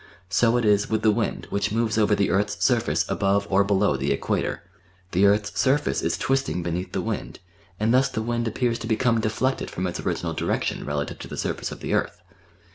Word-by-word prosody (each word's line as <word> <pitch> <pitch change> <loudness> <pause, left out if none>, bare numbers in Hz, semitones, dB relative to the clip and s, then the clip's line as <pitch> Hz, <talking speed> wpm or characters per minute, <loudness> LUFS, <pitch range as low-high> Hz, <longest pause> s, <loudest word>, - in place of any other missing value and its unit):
So 115 +3 +3
it 120 - 0
is 105 -1 +3
with 110 - 0
the 110 - +5
wind 110 +1 -2
which 100 +1 0
moves 115 0 0
over 105 -1 +3
the 100 -1 +1
earth's 100 +1 0
surface 95 - +2
above 100 0 +1
or 100 +1 +5
below 100 -5 +2
the 70 +1 -1
Equator 75 +4 -1 0.5
the 95 +3 +4
earth's 105 0 +1
surface 140 +2 +2
is - - 0
twisting 135 -9 0
beneath 85 +2 -3
the - - -1
wind, - - -4 0.4
and 110 +2 +2
thus 130 +1 +4
the 110 -3 -3
wind 120 0 -1
appears 115 +1 0
to 115 - -6
become 115 0 +2
deflected 120 +4 -1
from 90 - -3
its 90 - -3
original - - -2
direction - - -2
relative 75 -1 -3
to - - -7
the - - -7
surface - - -3
of - - -9
the - - -2
earth. - - -1
105 Hz, 205 wpm, -24 LUFS, 100-115 Hz, 0.5 s, the